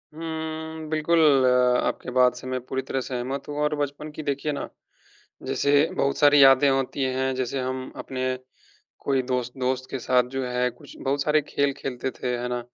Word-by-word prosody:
हुँ, 160 -1 -5
बिल्कुल 160 +2 +2 0.7
आपकी - - -3
बात 125 0 +4
से 125 - -9
मैं 130 0 -2
पूरी 130 0 -2
तरह 135 0 -3
सहमत 130 +2 -4
हूँ 145 - -5
और 150 0 +1
बचपन 145 +1 -3
की 150 +1 -7
देखिए 145 +1 -1
ना 140 - -4 0.8
जैसे 140 - 0 0.3
बहुत 140 0 0
सारी 145 -1 +6
यादें 135 +1 +7
होती 135 +1 -1
हैं, 130 0 0
जैसे 130 +1 -2
हम 130 0 -4
अपने 130 -1 -3 0.6
कोई 135 -2 +1
दोस्त 125 -1 -2
दोस्त 130 0 -1
के 135 - -3
साथ 125 0 +3
जो 135 -1 -1
है 125 0 0
कुछ 145 +4 -14
बहुत 140 +1 -1
सारे 150 +1 +3
खेल 140 -1 0
खेलते 130 -1 -4
थे 125 - -6
है 120 - -3
ना। 125 0 -1
135 Hz, 185 wpm, -25 LUFS, 130-145 Hz, 0.8 s, यादें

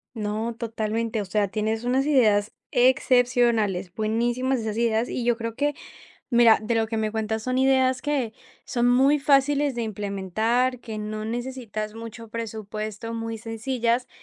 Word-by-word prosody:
No, 220 +2 -3
totalmente. 225 0 -2
O - - -5
sea, 200 +1 0
tienes 220 +2 -2
unas 255 +3 +1
ideas 220 -8 +3 0.2
excepcionales, 245 -7 +2
buenísimas 240 +5 0
esas 220 -1 -3
ideas. 230 0 +1
Y 245 - -3
yo 240 -1 +3
creo 230 -1 -5
que, 290 +2 0 0.6
mira, 235 -2 +6
de 220 +2 -1
lo 225 -1 +1
que 225 - -3
me 215 -1 -1
cuentas 220 0 -2
son 255 0 0
ideas 260 -1 +3
que 275 -7 -1 0.3
son 240 0 +1
muy 270 +4 +4
fáciles 280 0 +3
de 235 - -1
implementar, 220 +4 -1
que 220 -3 -6
no 215 0 -4
necesitas 230 -2 -4
mucho 230 0 -8
presupuesto, 220 0 -5
muy 225 0 -4
sencillas 235 +2 -1
230 Hz, 150 wpm, -25 LUFS, 215-250 Hz, 0.6 s, mira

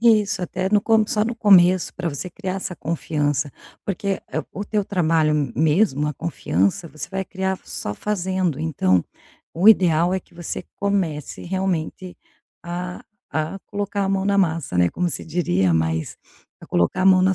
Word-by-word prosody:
Isso, 210 -5 +3
até 185 +2 -2
no 210 - +4
co 220 +1 +4
só 210 0 +1
no 235 +1 -2
começo 185 -4 +5
pra 175 -2 -2
você 150 +5 -4
criar 185 +2 -4
essa 185 -2 -4
confiança, 150 -4 -1 0.3
porque, 195 0 -2
eh, - - -1
o 205 - -5
teu 205 -1 -1
trabalho 155 -6 +1
mesmo, 150 -2 +2
a 150 - -3
confiança, 125 - -1
você 150 -1 -6
vai 190 0 -2
criar 190 0 -3
só 105 - -4
fazendo. 185 - -1
Então, 95 - +1 0.5
o 180 +6 +5
ideal 175 -4 +5
é - - +1
que 175 - -20
você 175 +1 -5
comece 185 -8 -2
realmente 185 -1 -3 0.5
a 180 +1 -5 0.3
a 160 +5 -1
colocar 205 -1 -2
a 195 - -1
mão 195 0 0
na 200 0 +2
massa, 165 - 0
né, 90 0 +4
como 180 -1 -1
você - - -4
diria, 95 - +1
mas 80 0 -1 0.4
a - - -12
colocar 85 - +1
a - - +4
mão 185 -1 +6
na 190 0 +3
180 Hz, 175 wpm, -22 LUFS, 155-195 Hz, 0.5 s, mão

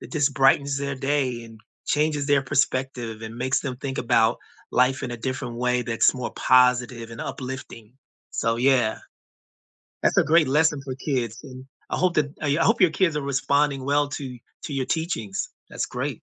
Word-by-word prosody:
that - - -11
just 145 -3 +1
brightens 140 0 +3
their 140 0 -2
day 130 -3 -1
and 115 -1 -13 0.3
changes 150 -1 +1
their 145 -1 +3
perspective 130 -4 -1
and 110 +1 -7
makes 130 +2 0
them 130 -3 -4
think 135 +1 -5
about 115 0 +3 0.3
life 130 +2 +2
in 120 - -3
a 120 - -4
different 125 0 -4
way 125 0 +1
that's 115 -1 +2
more 125 -1 -4
positive 125 -2 +3
and 115 - -8
uplifting, 125 -3 -7 0.4
so 115 0 0
yeah. 125 -3 +2 1.0
That's - - +2
a - - +6
great 160 -2 +4
lesson 150 +1 +2
for 130 - -5
kids 125 -5 -2
and 130 -2 -10 0.2
I - - -1
hope 180 -1 +1
that 145 -1 +1
I 145 - 0
hope 230 -1 +3
your 180 - +7
kids 170 -2 +1
are 150 - -1
responding 140 0 +1
well 145 0 +2
to 135 -3 -6 0.3
to 145 - -5
your 135 -2 -1
teachings, 135 - -2 0.2
that - - -11
great. - - -4
130 Hz, 180 wpm, -24 LUFS, 125-145 Hz, 1.0 s, your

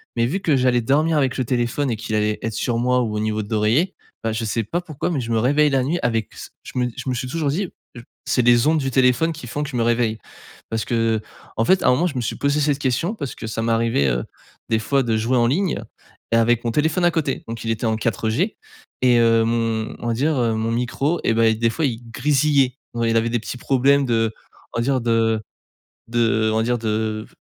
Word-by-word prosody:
mais 115 - +2
vu 150 +11 -1
que 155 -7 +2
j'allais 125 -2 +2
dormir 150 +6 +2
avec 135 -3 +1
le 130 - 0
téléphone 120 +3 0
et - - 0
qu'il 110 0 -4
allait 105 0 0
être 115 - -3
sur 115 +2 -1
moi 125 +1 +2
ou 110 -3 -2
au - - -1
niveau 110 0 -1
de 100 - -11
l'oreiller, 115 - +2 0.3
bah, 115 - 0
je 110 +1 -3
sais 115 +1 -1
pas 170 - -2
pourquoi, 155 -3 -4
mais 145 - -1
je 115 -1 -5
me 115 - +2
réveille 145 +6 +3
la 135 -2 +1
nuit 160 +7 -1
avec 115 -2 -1
s - - -10
je - - -9
me 125 0 +1
je - - -4
me - - 0
suis 125 +1 -3
toujours 150 +1 -1
dit: 180 +5 -1 0.3
«J 120 - -8 0.3
c'est 125 - +2
les 120 0 +4
ondes 155 +1 +3
du 135 -2 -1
téléphone 130 +5 +3
qui 155 -5 -9
font 145 +5 -4
que 150 - -3
je 135 - -7
me 115 - +2
réveille». 115 -1 +1 0.5
Parce 110 -1 -1
que 115 -2 0 0.4
en 115 - +2
fait, 190 +7 +3
à - - +3
un - - +6
moment, 155 +8 +2
je 150 - -5
me 125 - -1
suis 115 - -3
posé 140 +1 +1
cette 145 -1 +1
question, 140 - 0
parce 140 - -6
que - - -8
ça 110 0 -3
m'arrivait, 115 -9 +1
heu, - - 0 0.5
des 110 - +2
fois 135 +4 +1
de 115 -2 0
jouer 115 +4 +1
en 120 - +3
ligne, 175 +7 0 0.5
et - - +3
avec 115 0 +2
mon 115 - +1
téléphone 160 +6 +1
à 175 - +4
côté. 155 -5 -2
Donc 115 0 -6
il 115 - -3
était 115 +1 -1
en 110 -1 +1
4G 115 - -1 0.5
et 125 -1 +5
hem, 115 -1 +1
on 120 - -5
va 115 - +1
dire, 145 +7 +1
heu, 115 -2 +1
mon 110 +1 -1
micro, 130 +7 -1
et - - +2
bah, 115 0 +3
il 110 -1 +1
des 115 0 +3
fois, 155 +7 -1
il 120 -4 -2
grésillait. 140 -1 +2 0.2
Ouais, 115 -1 +1
il 115 - +2
avait 115 +1 +1
des 120 0 0
petits 115 - -6
problèmes 135 +2 +3
de 115 -2 +1 0.4
on - - -1
va - - +1
dire, 130 0 +1
de 115 -1 +1 0.7
de 115 -2 +2
on - - +1
va 110 - +2
dire 120 +1 0
de 110 -1 -2
v - - -25
120 Hz, 260 wpm, -21 LUFS, 115-140 Hz, 0.7 s, un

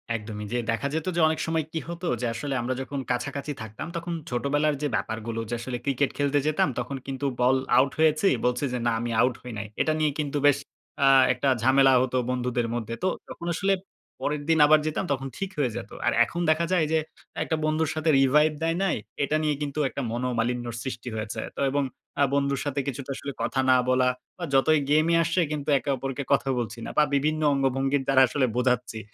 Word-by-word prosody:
একদমই 105 -1 -6
যে 120 - +1
দেখা 115 +5 -1
যেতো 160 +3 -1
যে - - +1
অনেক 160 0 0
সময় 160 -2 0
কি 165 - -2
হতো, 170 +1 -5
যে - - -1
আসলে 135 +4 -4
আমরা 125 +2 -1
যখন 140 +1 -4
কাছাকাছি 140 +4 -3
থাকতাম, 110 +6 -7
তখন 170 +1 -3 0.2
ছোটবেলার 145 +4 +1
যে 150 - +1
ব্যাপারগুলো 115 +1 -3
যে 120 - -3
আসলে 125 +1 -4
ক্রিকেট 140 0 +1
খেলতে 145 0 +2
যেতাম 155 0 +2
তখন 125 +3 -4
কিন্তু 135 +1 -4 0.2
বল 125 +2 +4 0.2
আউট 135 +1 +4
হয়েছি, 155 +4 +4 0.2
বলছি 125 +2 +1
যে, - - 0
"না, - - +3
আমি 120 +1 -3
আউট 125 -1 +2
হই 125 - -8
নাই।" 110 0 -4
এটা 155 - +2
নিয়ে 155 -1 +2
কিন্তু 145 -1 -1
বেশ 145 -1 +5 0.5
আ - - +6 0.3
একটা 135 +2 0
ঝামেলা 135 +2 +5
হতো 130 0 0
বন্ধুদের 125 -2 -1
মধ্যে। 115 -1 -4
তো - - +3 0.2
তখন 170 - -8
আসলে 195 +4 +1 0.5
পরের 150 0 -2
দিন 165 - +4
আবার 155 +1 +6
যেতাম, 155 - -1
তখন 135 0 -4
ঠিক 195 - -3
হয়ে 135 -5 +1
যেতো। - - -8
আর - - +3
এখন 170 +8 -4
দেখা 160 +2 +3
যায় 175 -4 +3
যে 160 - +3 0.4
একটা 160 - -1
বন্ধুর 155 0 +1
সাথে 155 +1 0
revive 150 +3 +4
দেয় 165 +1 +1
নাই, 195 - +1 0.3
এটা 150 - 0
নিয়ে 150 -1 +1
কিন্তু 145 0 -3
একটা 140 - -5
মনোমালিন্যর 120 -1 -2
সৃষ্টি 125 -2 -5
হয়েছে 110 +1 -4 0.2
তো - - -4
এবং 145 +1 +1 0.4
আ - - +7
বন্ধুর 140 -1 +1
সাথে 145 0 -1
কিছুটা 135 0 -5
আসলে 140 - -5
কথা 135 - -1
না 130 - +7
বলা 130 0 +3 0.3
বা 180 - -7
যতই 150 +3 +4
গেইম 155 +2 +4
এ - - +5
আসছে 170 +2 +1
কিন্তু 150 0 -3
একে 130 +3 -4
অপরকে 135 +2 -4
কথা 135 -1 +1
বলছি 115 0 -4
না - - -5
বা 150 - +7
বিভিন্ন 155 +3 +1
অঙ্গভঙ্গির 135 0 +1
দ্বারা 135 -1 +5
আসলে 135 +1 +1
বোঝাচ্ছি। 125 -2 0
140 Hz, 210 wpm, -26 LUFS, 125-155 Hz, 0.5 s, আ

